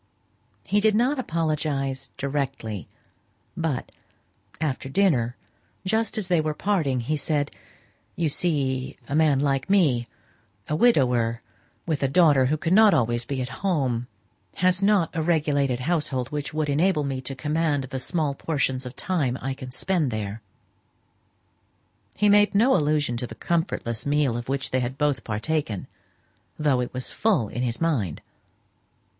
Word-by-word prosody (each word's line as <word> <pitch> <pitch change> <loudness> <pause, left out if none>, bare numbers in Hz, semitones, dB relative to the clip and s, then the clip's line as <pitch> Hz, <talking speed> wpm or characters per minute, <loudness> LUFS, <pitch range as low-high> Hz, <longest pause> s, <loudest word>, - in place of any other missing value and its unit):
He 205 - +2
did 215 0 +3
not 255 +5 +2
apologize 150 - -1
directly, 135 - -3 0.7
but, 160 -6 -2 0.7
after 135 -3 -2
dinner, 135 -9 +2 0.5
just 220 +4 0
as 210 -4 -1
they 175 -3 +3
were 155 -1 -2
parting, 155 -12 0
he 145 +7 -1
said, 145 -1 -1 0.6
"You 170 - 0
see 135 -5 -1
a - - -5
man 150 -3 +4
like 135 0 0
me 145 -12 +3 0.6
a 150 - -1
widower 125 - +3 0.4
with 155 -4 -1
a 135 - +2
daughter 140 -3 +4
who 155 +3 +1
cannot 190 +5 +5
always 120 -3 +1
be 130 0 -2
at 125 - -6
home 135 -11 0 0.5
has 185 +1 +3
not 195 -5 +3
the 165 - -2
regulated 145 -6 +1
household 140 -4 -1
which 145 0 -4
would 155 -1 -1
enable 155 +2 +2
me 135 -2 -3
to 135 +1 -5
command 150 0 0
the 130 0 -5
small 150 +1 0
portions 135 -3 -1
of 125 - -9
time 145 -9 -1
I 135 +1 -3
can 130 -1 -8
spend 160 +3 0
there." 110 -1 -4 1.7
He 210 - +2
made 205 0 +5
no 240 +6 +5
allusion 150 -6 +1
to 125 - -4
the - - -10
comfortless 145 -9 -2
meal 145 -4 +2
of 120 +1 -5
which 135 0 -2
they 130 - +2
had 125 +2 -3
both 145 -2 0
partaken, 110 -1 -2 0.7
though 145 -4 +2
it 125 - -2
was 125 0 -3
full 185 - +1
in 120 - -4
his 120 -2 -1
mind. 130 - -1
145 Hz, 150 wpm, -25 LUFS, 130-165 Hz, 1.7 s, cannot